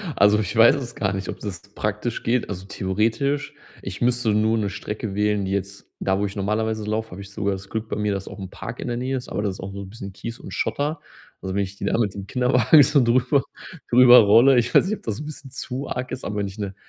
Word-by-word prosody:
Also, 105 Hz, +1 st, +5 dB
ich 105 Hz, -1 st, -3 dB
weiß 115 Hz, +1 st, +7 dB
es 125 Hz, -4 st, -6 dB
gar 100 Hz, -3 st, -1 dB
nicht, 95 Hz, -1 st, -4 dB
ob -, -, -5 dB
das 100 Hz, -5 st, -5 dB
praktisch 105 Hz, +3 st, -3 dB
geht. 120 Hz, +1 st, 0 dB
Also, 95 Hz, -2 st, -6 dB
theoretisch 115 Hz, +10 st, -1 dB, 0.3 s
ich 95 Hz, 0 st, -7 dB
müsste 120 Hz, -1 st, +2 dB
nur 110 Hz, +2 st, +2 dB
'ne 105 Hz, -2 st, -1 dB
Strecke 105 Hz, +1 st, -5 dB
wählen, 105 Hz, -1 st, +1 dB
die 95 Hz, -, -3 dB
jetzt 100 Hz, 0 st, -4 dB
da, 95 Hz, 0 st, 0 dB
wo 100 Hz, -, +1 dB
ich 100 Hz, -, -5 dB
normalerweise 110 Hz, +2 st, -1 dB
laufe, 110 Hz, +1 st, -2 dB
habe 90 Hz, +2 st, -8 dB
ich 100 Hz, 0 st, -11 dB
sogar 100 Hz, 0 st, -1 dB
das 95 Hz, 0 st, -8 dB
Glück 110 Hz, 0 st, -4 dB
bei -, -, -2 dB
mir, 105 Hz, -1 st, 0 dB
dass 100 Hz, -1 st, -5 dB
auch -, -, -9 dB
'n 95 Hz, -2 st, -6 dB
Park -, -, -8 dB
in -, -, -5 dB
der 120 Hz, -, -2 dB
Nähe 130 Hz, +2 st, -2 dB
ist, 125 Hz, -, -7 dB
aber -, -, -2 dB
das 100 Hz, -2 st, -1 dB
ist -, -, -13 dB
auch 95 Hz, +1 st, -6 dB
so 100 Hz, -, -6 dB
'n 95 Hz, -, -9 dB
bisschen 100 Hz, -2 st, -9 dB
Kies 115 Hz, +4 st, -7 dB
und -, -, -9 dB
Schotter. 150 Hz, +3 st, -1 dB, 0.4 s
Also, 95 Hz, 0 st, -4 dB
wenn 100 Hz, -, +2 dB
ich 95 Hz, +1 st, -7 dB
die -, -, -5 dB
da -, -, +1 dB
mit 105 Hz, -5 st, 0 dB
dem 100 Hz, -1 st, -8 dB
Kinderwagen 125 Hz, +5 st, +5 dB
so 135 Hz, +1 st, +3 dB
drüber 125 Hz, +3 st, +3 dB, 0.5 s
drüber 125 Hz, 0 st, +8 dB
rolle, 115 Hz, +5 st, +6 dB
ich 120 Hz, 0 st, +1 dB
weiß -, -, +6 dB
nicht, 215 Hz, -, -1 dB
ob -, -, -24 dB
das 110 Hz, 0 st, -3 dB
'n 150 Hz, -, -6 dB
bisschen 145 Hz, -3 st, -9 dB
zu 130 Hz, +1 st, -5 dB
arg 125 Hz, 0 st, -4 dB
ist, 130 Hz, -, -5 dB
aber 105 Hz, 0 st, -4 dB
wenn 100 Hz, -, -1 dB
ich 95 Hz, +2 st, -10 dB
'ne 100 Hz, -2 st, -4 dB
105 Hz, 270 wpm, -23 LUFS, 100-125 Hz, 0.5 s, drüber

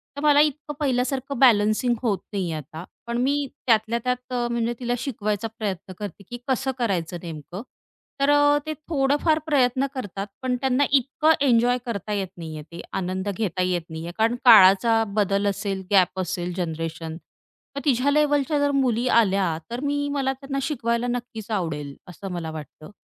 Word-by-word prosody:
तर 285 Hz, -, -5 dB
मला 295 Hz, -1 st, +5 dB
इतकं 295 Hz, 0 st, -1 dB
पहिल्यासारखं 270 Hz, -1 st, -1 dB
बॅलन्सिंग 225 Hz, -1 st, +4 dB
होत 220 Hz, -6 st, +1 dB, 0.2 s
नाहीये 180 Hz, -5 st, -2 dB
आता. 155 Hz, +2 st, -8 dB, 0.2 s
पण 235 Hz, 0 st, -2 dB
मी 280 Hz, +3 st, +1 dB, 0.2 s
त्यातल्या 225 Hz, 0 st, +3 dB
त्यात 250 Hz, 0 st, -2 dB, 0.2 s
म्हणजे 235 Hz, 0 st, 0 dB
तिला 245 Hz, -1 st, -1 dB
शिकवायचा 215 Hz, -4 st, -2 dB
प्रयत्न 195 Hz, -3 st, -4 dB
करते, 205 Hz, -1 st, -7 dB
की 240 Hz, -, -5 dB
कसं 265 Hz, 0 st, 0 dB
करायचं 180 Hz, -7 st, -1 dB
नेमकं? 165 Hz, +3 st, -7 dB, 0.6 s
तर 275 Hz, -, +3 dB
अ, 290 Hz, 0 st, +5 dB
ते 310 Hz, -, -2 dB, 0.2 s
थोडंफार 295 Hz, +1 st, +2 dB
प्रयत्न 265 Hz, -3 st, +2 dB
करतात 205 Hz, -6 st, -5 dB
पण 255 Hz, -1 st, 0 dB
त्यांना 265 Hz, +1 st, +2 dB
इतकं 280 Hz, +3 st, +3 dB
एन्जॉय 245 Hz, -1 st, +4 dB
करता 210 Hz, -3 st, -4 dB
येत 195 Hz, -2 st, -1 dB
नाहीये, 160 Hz, -2 st, -7 dB
ते 170 Hz, -, -7 dB
आनंद 185 Hz, +1 st, -2 dB
घेता 195 Hz, -3 st, -2 dB
येत 180 Hz, -1 st, +1 dB
नाहीये. 160 Hz, +1 st, -6 dB
कारण 225 Hz, +2 st, +2 dB
काळाचा 225 Hz, 0 st, +7 dB
बदल 200 Hz, -1 st, +1 dB
असेल, 195 Hz, -1 st, -3 dB
गॅप 190 Hz, -1 st, +3 dB
असेल 180 Hz, -1 st, -3 dB
जनरेशन. 165 Hz, -1 st, -4 dB, 0.6 s
मग 280 Hz, -, -3 dB
तिच्या 270 Hz, 0 st, +3 dB
लेव्हलच्या 290 Hz, 0 st, +2 dB
जर 285 Hz, 0 st, +2 dB
मुली 255 Hz, -3 st, +1 dB
आल्या 190 Hz, -6 st, +1 dB
तर 240 Hz, -, -3 dB
मी 285 Hz, 0 st, 0 dB
मला 270 Hz, -2 st, 0 dB
त्यांना 275 Hz, +1 st, -5 dB
शिकवायला 240 Hz, -4 st, -1 dB
नक्कीच 240 Hz, -2 st, -5 dB
आवडेल 150 Hz, -8 st, -3 dB
असं 185 Hz, +2 st, -8 dB
मला 170 Hz, -2 st, -4 dB
वाटतं. 155 Hz, 0 st, -10 dB
230 Hz, 160 wpm, -24 LUFS, 185-270 Hz, 0.6 s, काळाचा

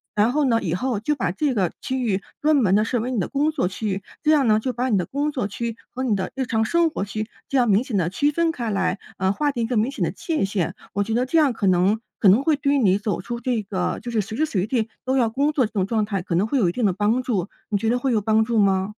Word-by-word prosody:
然 210 Hz, +3 st, +3 dB
后 300 Hz, +2 st, +1 dB
呢， 230 Hz, -3 st, +2 dB
以 165 Hz, -, -2 dB
后 225 Hz, +3 st, -1 dB
就 300 Hz, +7 st, 0 dB
把 195 Hz, -10 st, -1 dB
这 275 Hz, +7 st, 0 dB
个 190 Hz, -6 st, 0 dB
区 260 Hz, 0 st, -2 dB
域 195 Hz, -4 st, 0 dB, 0.2 s
专 305 Hz, 0 st, +3 dB
门 205 Hz, -8 st, +3 dB
地 210 Hz, -, +4 dB
设 240 Hz, +1 st, -1 dB
为 245 Hz, +3 st, -3 dB
你 245 Hz, -, -1 dB
的 180 Hz, -, -1 dB
工 290 Hz, +2 st, +1 dB
作 290 Hz, -, 0 dB
区 205 Hz, +4 st, -4 dB
域。 195 Hz, 0 st, -2 dB, 0.2 s
这 310 Hz, -, +4 dB
样 285 Hz, -5 st, +4 dB
呢， 215 Hz, 0 st, +4 dB
就 255 Hz, +2 st, -2 dB
把 250 Hz, +2 st, -1 dB
你 210 Hz, -, +3 dB
的 180 Hz, -, 0 dB
工 290 Hz, +2 st, -2 dB
作 250 Hz, -7 st, -2 dB
区 230 Hz, +2 st, -4 dB
和 260 Hz, +1 st, -5 dB
你 225 Hz, -5 st, +1 dB
的 190 Hz, -, -3 dB
日 265 Hz, -1 st, -1 dB
常 220 Hz, -1 st, +1 dB
生 340 Hz, +5 st, +2 dB
活 250 Hz, -, -3 dB
区 215 Hz, +1 st, -4 dB, 0.2 s
这 275 Hz, -, +1 dB
样 245 Hz, -3 st, +3 dB
明 205 Hz, +4 st, +4 dB
显 250 Hz, -7 st, -2 dB
地 170 Hz, -2 st, +1 dB
区 290 Hz, +9 st, +1 dB
分 335 Hz, +2 st, +1 dB
开 240 Hz, -8 st, -4 dB
来， 190 Hz, 0 st, 0 dB, 0.2 s
呃， 190 Hz, 0 st, +1 dB
划 290 Hz, +7 st, 0 dB
定 240 Hz, -4 st, -2 dB
一 -, -, -1 dB
个 240 Hz, -2 st, -1 dB
明 225 Hz, +5 st, +1 dB
显 -, -, -3 dB
的 -, -, 0 dB
界 320 Hz, -, -2 dB
限。 190 Hz, -3 st, -2 dB, 0.2 s
我 200 Hz, +1 st, +1 dB
觉 220 Hz, -, -3 dB
得 245 Hz, +2 st, +1 dB
这 325 Hz, +6 st, +1 dB
样 290 Hz, -6 st, +4 dB
可 205 Hz, -3 st, -1 dB
能 185 Hz, +4 st, +3 dB, 0.2 s
可 200 Hz, -, +4 dB
能 210 Hz, +7 st, +5 dB
会 310 Hz, -1 st, +3 dB
对 280 Hz, 0 st, 0 dB
于 285 Hz, -, +3 dB
你 195 Hz, -6 st, +3 dB
走 205 Hz, -2 st, -2 dB
出 235 Hz, +4 st, -5 dB
这 240 Hz, -2 st, -1 dB
个 190 Hz, -2 st, -2 dB
就 240 Hz, -, -6 dB
是 220 Hz, -2 st, +1 dB
随 210 Hz, +3 st, -7 dB
时 315 Hz, -, +2 dB
随 195 Hz, -9 st, -1 dB
地 230 Hz, -2 st, 0 dB, 0.2 s
都 260 Hz, +1 st, +1 dB
要 235 Hz, -3 st, +3 dB
工 280 Hz, +6 st, +1 dB
作 280 Hz, -6 st, +2 dB
这 -, -, -22 dB
种 195 Hz, -3 st, 0 dB
状 215 Hz, +1 st, 0 dB
态 200 Hz, -3 st, -2 dB
可 180 Hz, -, -4 dB
能 190 Hz, +5 st, +2 dB
会 275 Hz, -, 0 dB
有 215 Hz, -8 st, +3 dB
一 -, -, -1 dB
定 240 Hz, +3 st, -1 dB
的 190 Hz, -, +2 dB
帮 210 Hz, +6 st, +1 dB
助， 205 Hz, -7 st, -2 dB, 0.2 s
你 205 Hz, -, +1 dB
觉 220 Hz, +3 st, -1 dB
得 245 Hz, +1 st, +1 dB
会 265 Hz, +1 st, 0 dB
有 220 Hz, -3 st, +2 dB
帮 220 Hz, +1 st, +3 dB
助 230 Hz, 0 st, -1 dB
吗？ 195 Hz, 0 st, +2 dB
225 Hz, 340 characters per minute, -23 LUFS, 200-260 Hz, 0.2 s, 能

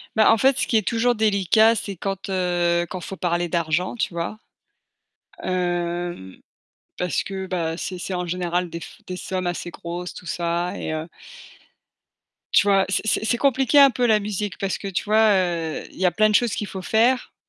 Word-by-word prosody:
Bah 220 Hz, 0 st, +6 dB
en 225 Hz, -, +4 dB
fait, 270 Hz, +3 st, +3 dB
ce -, -, 0 dB
qui 225 Hz, -, +3 dB
est 210 Hz, -, -1 dB
toujours 240 Hz, +1 st, +2 dB
délicat, 215 Hz, +1 st, +4 dB
c'est 200 Hz, -3 st, -4 dB
quand, 195 Hz, +1 st, -4 dB
heu 175 Hz, -2 st, +1 dB
quand 185 Hz, -, -6 dB
il -, -, -11 dB
faut 195 Hz, -, -7 dB
parler 175 Hz, -1 st, -1 dB
d'argent, 170 Hz, +4 st, 0 dB
tu 205 Hz, -6 st, -2 dB
vois? 170 Hz, +5 st, -4 dB, 1.1 s
Hem, 175 Hz, -, -2 dB, 0.6 s
parce 180 Hz, -1 st, 0 dB
que 190 Hz, -1 st, -6 dB, 0.3 s
c'est 185 Hz, -1 st, -5 dB
c'est 185 Hz, +2 st, -5 dB
en 180 Hz, 0 st, -2 dB
général 175 Hz, 0 st, -1 dB
des 170 Hz, -, -6 dB, 0.3 s
des 180 Hz, 0 st, -6 dB
sommes 185 Hz, 0 st, -3 dB
assez 175 Hz, 0 st, -4 dB
grosses 175 Hz, +1 st, -6 dB
tout 180 Hz, -, -11 dB
ça 175 Hz, +2 st, -2 dB
et 155 Hz, -, -3 dB
heu, 155 Hz, +1 st, -3 dB, 1.5 s
tu 205 Hz, -, +5 dB
vois, 195 Hz, -1 st, +4 dB
c'est 215 Hz, +2 st, 0 dB
c'est 240 Hz, -, +2 dB
compliqué 270 Hz, +2 st, +3 dB
un 275 Hz, -1 st, +9 dB
peu 245 Hz, +1 st, 0 dB
la 215 Hz, -2 st, +4 dB
musique 205 Hz, -1 st, -4 dB
parce 195 Hz, -1 st, -2 dB
que 200 Hz, -, -5 dB
tu 190 Hz, -, -2 dB
vois, 215 Hz, +1 st, +4 dB
heu, 170 Hz, -4 st, -1 dB
il -, -, -15 dB
y 185 Hz, -, +4 dB
a -, -, +4 dB
plein 215 Hz, +2 st, +3 dB
de -, -, -1 dB
choses 240 Hz, -1 st, +3 dB
qu'il 210 Hz, -, -3 dB
faut 190 Hz, -, -6 dB
faire, 235 Hz, +6 st, +1 dB
185 Hz, 195 wpm, -23 LUFS, 175-215 Hz, 1.5 s, un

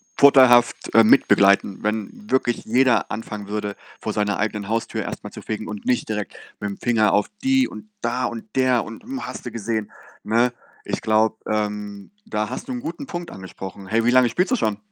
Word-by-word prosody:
vorteilhaft, 130 Hz, -4 st, +5 dB
äh, 115 Hz, -, +7 dB
mitbegleiten, 100 Hz, -4 st, +4 dB
wenn 110 Hz, -, -4 dB
wirklich 120 Hz, -2 st, +1 dB
jeder 125 Hz, +2 st, +3 dB
anfangen 105 Hz, -2 st, -5 dB
würde, 105 Hz, 0 st, -3 dB, 0.2 s
vor 110 Hz, -, -3 dB
seiner 105 Hz, -1 st, 0 dB
eigenen 105 Hz, -1 st, -2 dB
Haustür 115 Hz, +1 st, -1 dB
erst -, -, -6 dB
mal -, -, -8 dB
zu -, -, -9 dB
fegen 110 Hz, 0 st, -5 dB
und 105 Hz, -1 st, -7 dB
nicht 125 Hz, -, +1 dB
direkt 105 Hz, -2 st, -4 dB, 0.3 s
mit'm 100 Hz, -1 st, -4 dB
Finger 110 Hz, -4 st, +2 dB
auf 105 Hz, 0 st, +2 dB, 0.2 s
die 265 Hz, 0 st, +3 dB
und 215 Hz, -, -11 dB
da 125 Hz, +2 st, -1 dB
und 120 Hz, -1 st, -5 dB
der 130 Hz, -2 st, +3 dB
und, 110 Hz, -, -10 dB
hm, 265 Hz, +2 st, -5 dB
hast -, -, -8 dB
du 120 Hz, -, -5 dB
gesehen, 110 Hz, -1 st, -3 dB, 0.3 s
ne? 120 Hz, +3 st, +2 dB, 0.3 s
Ich -, -, -3 dB
glaube, 110 Hz, 0 st, +2 dB
ähm, 105 Hz, -1 st, -3 dB
da 105 Hz, 0 st, -2 dB
hast -, -, -6 dB
du -, -, -5 dB
'n 245 Hz, -, -4 dB
guten 285 Hz, -1 st, -6 dB
Punkt 175 Hz, -6 st, -6 dB
angesprochen. 95 Hz, +1 st, -9 dB
Hey, 115 Hz, +3 st, +1 dB
wie 120 Hz, -, +4 dB
lange 130 Hz, -1 st, +5 dB
spielst 180 Hz, -, 0 dB
du -, -, +4 dB
schon? 105 Hz, -, 0 dB
110 Hz, 195 wpm, -22 LUFS, 105-125 Hz, 0.3 s, äh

